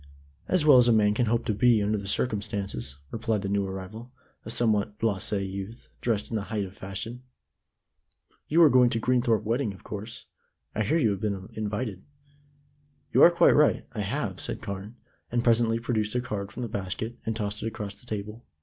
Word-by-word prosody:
"As 185 Hz, -5 st, +2 dB
well 140 Hz, -4 st, +8 dB
as 120 Hz, -, +5 dB
a -, -, +5 dB
man 105 Hz, -1 st, +4 dB
can 120 Hz, +2 st, +1 dB
hope 115 Hz, +1 st, +1 dB
to 110 Hz, -, +1 dB
be 120 Hz, +2 st, +4 dB
under 105 Hz, +1 st, +1 dB
the 100 Hz, -, -7 dB
circumstances," 100 Hz, -, -2 dB, 0.2 s
replied 110 Hz, -2 st, -1 dB
the 100 Hz, -, -2 dB
new 100 Hz, -1 st, 0 dB
arrival, 95 Hz, +6 st, -7 dB, 0.3 s
a -, -, -8 dB
somewhat 105 Hz, -3 st, +1 dB
blasé 100 Hz, -2 st, -1 dB
youth, 100 Hz, +5 st, -7 dB
dressed 110 Hz, -3 st, -1 dB
in -, -, -1 dB
the 105 Hz, -2 st, -2 dB
height 105 Hz, -2 st, -2 dB
of 95 Hz, +1 st, -11 dB
fashion. 105 Hz, +7 st, -5 dB, 1.3 s
"You 170 Hz, +3 st, +5 dB
are 155 Hz, -, +8 dB
going 125 Hz, -1 st, +6 dB
to 115 Hz, -, -1 dB
the -, -, -10 dB
Greenthorpe 120 Hz, -3 st, +2 dB
wedding, 115 Hz, -1 st, -1 dB
of -, -, -17 dB
course. 105 Hz, +2 st, -7 dB, 0.5 s
I -, -, -1 dB
hear 115 Hz, +10 st, +2 dB
you 115 Hz, -10 st, +3 dB
have 100 Hz, -, -3 dB
been 100 Hz, -3 st, -3 dB
invited." 105 Hz, -2 st, -3 dB, 1.1 s
"You -, -, +5 dB
are -, -, +10 dB
quite 170 Hz, -, +5 dB
right; 150 Hz, 0 st, +3 dB
I 105 Hz, -, -3 dB
have," 100 Hz, -3 st, -2 dB
said -, -, -3 dB
Carne, 100 Hz, +1 st, -6 dB, 0.4 s
and 120 Hz, 0 st, +1 dB
presently 115 Hz, -1 st, +3 dB
produced 115 Hz, -2 st, -1 dB
a -, -, +3 dB
card 105 Hz, -6 st, -4 dB
from 125 Hz, -, -6 dB
the -, -, -2 dB
basket, 105 Hz, +4 st, -4 dB
and 110 Hz, -, -2 dB
tossed 105 Hz, -2 st, -3 dB
it -, -, -2 dB
across 105 Hz, -3 st, -6 dB
the 125 Hz, -, -18 dB
table. 105 Hz, +2 st, -5 dB
110 Hz, 205 wpm, -27 LUFS, 100-120 Hz, 1.3 s, are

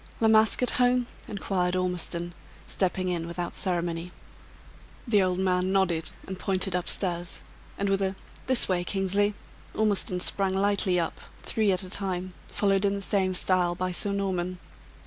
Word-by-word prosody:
"La 225 Hz, -, +3 dB
Masque 220 Hz, +2 st, +4 dB
at 250 Hz, -, +1 dB
home?" 250 Hz, 0 st, +3 dB, 0.2 s
inquired 185 Hz, -3 st, -1 dB
Ormiston, 175 Hz, -1 st, -2 dB, 0.3 s
stepping 185 Hz, -1 st, -1 dB
in, 170 Hz, -2 st, -2 dB
without 175 Hz, 0 st, -4 dB
ceremony. 175 Hz, -1 st, -1 dB, 1.0 s
The 210 Hz, -4 st, +4 dB
old 185 Hz, -1 st, +1 dB
man 185 Hz, 0 st, +1 dB
nodded, 180 Hz, -4 st, +1 dB, 0.2 s
and 190 Hz, -1 st, -7 dB
pointed 190 Hz, -1 st, 0 dB
up 180 Hz, -, -1 dB
stairs; 175 Hz, -2 st, -2 dB, 0.3 s
and 200 Hz, -, -1 dB
with 195 Hz, 0 st, +1 dB
a 190 Hz, 0 st, 0 dB, 0.3 s
"This 260 Hz, -2 st, +3 dB
way, 180 Hz, -2 st, 0 dB
Kingsley," 200 Hz, +2 st, 0 dB, 0.4 s
Ormiston 205 Hz, -4 st, +3 dB
sprang 190 Hz, +1 st, +3 dB
lightly 195 Hz, -2 st, +2 dB
up, 165 Hz, -, -3 dB, 0.2 s
three 215 Hz, -3 st, +1 dB
at 185 Hz, 0 st, +1 dB
a 185 Hz, -, -7 dB
time, 185 Hz, -2 st, -2 dB
followed 195 Hz, -1 st, +1 dB
in 200 Hz, 0 st, +2 dB
the 200 Hz, -, -4 dB
same 190 Hz, -1 st, +1 dB
style 180 Hz, -1 st, +2 dB
by 185 Hz, +1 st, -2 dB
Sir 200 Hz, +3 st, +3 dB
Norman. 185 Hz, -2 st, -2 dB
185 Hz, 160 wpm, -27 LUFS, 180-200 Hz, 1.0 s, Masque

